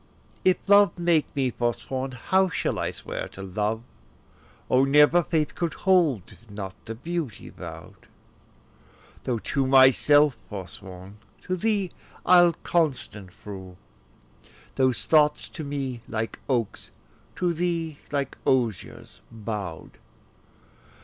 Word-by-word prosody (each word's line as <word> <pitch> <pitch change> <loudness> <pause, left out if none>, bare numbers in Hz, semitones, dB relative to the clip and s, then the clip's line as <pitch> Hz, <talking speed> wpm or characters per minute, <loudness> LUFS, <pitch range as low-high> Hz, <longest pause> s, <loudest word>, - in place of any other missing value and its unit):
If 185 -1 +4
love 200 -1 +5
make 170 -3 +2
me 130 -3 +1
forsworn, 130 +3 -3
how 190 +10 +2
shall - - -2
I - - -1
swear - - -6
to 95 - -8
love? 105 +4 -2 0.8
O 130 +1 +4
never 150 +5 +5
faith 155 -3 -1
could 170 -2 -3
hold, 170 - +3
if 110 +3 -19
not 100 -2 -6
to 115 - -5
beauty 160 -1 -5
vow'd: - - -11 1.2
Though 125 -2 0
to 130 +6 -1
myself 135 +1 +5
forsworn, 95 0 -9 0.2
to 185 - -2
thee 200 -1 0 0.3
I'll 175 -1 +6
constant 130 - -1
prove; 95 -3 -8 1.0
Those 130 -2 +1
thoughts, 150 -2 +3
to 155 - -7
me 135 -4 -4
like 110 0 -4
oaks, 120 -5 -1 0.5
to 175 -1 0
thee 165 -3 -2
like 140 -2 -2
osiers 120 -7 -1
bow'd. 105 -7 -6
135 Hz, 115 wpm, -25 LUFS, 110-165 Hz, 1.2 s, I'll